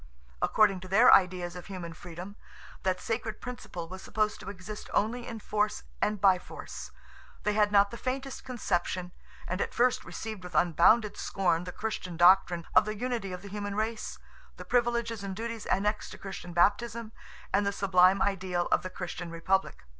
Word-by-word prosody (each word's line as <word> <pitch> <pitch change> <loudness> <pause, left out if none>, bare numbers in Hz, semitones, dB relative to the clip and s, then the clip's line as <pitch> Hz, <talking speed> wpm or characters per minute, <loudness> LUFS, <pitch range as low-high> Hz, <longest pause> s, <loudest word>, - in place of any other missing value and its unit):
According 205 -3 +3
to 185 - -10
their 215 +6 +7
ideas 180 -2 +3
of 180 - -9
human 180 -4 -6
freedom, 175 +4 -9 0.5
that 185 -2 0
sacred 225 -2 -3
principle 185 -9 -7
was 185 +2 -8
supposed 215 +1 -1
to - - -8
exist 205 +2 -8
only 235 +3 0
in 230 -2 -6
force 210 - -1 0.2
and 210 -1 +1
by 190 -2 +5
force; - - -9 0.5
they 210 - +1
had 210 -1 +3
not 200 0 +5
the 235 - -6
faintest 265 +1 -4
conception, 185 -7 -2 0.4
and 185 +2 -2
at - - -3
first 250 +1 +3
received 215 -4 -6
with 180 0 -9
unbounded 180 +6 +4
scorn 175 -3 0
the 180 - -5
Christian 185 -4 -4
doctrine 175 -1 +5
of - - +6
the 215 0 -4
unity 235 -4 -2
of 180 0 -7
the 200 - -8
human 205 0 -4
race, 220 +1 -2 0.4
the - - -9
privileges 235 -3 0
and 195 -1 -4
duties 230 +1 -5
annexed 210 +2 0
to - - -9
Christian 190 -2 -7
baptism, 215 +5 +1 0.4
and 200 - +4
the 200 - +1
sublime 190 -1 +4
ideal 185 -3 0
of - - +4
the 185 - -5
Christian 175 -1 -6
republic. 185 +3 -1
200 Hz, 175 wpm, -29 LUFS, 180-220 Hz, 0.5 s, their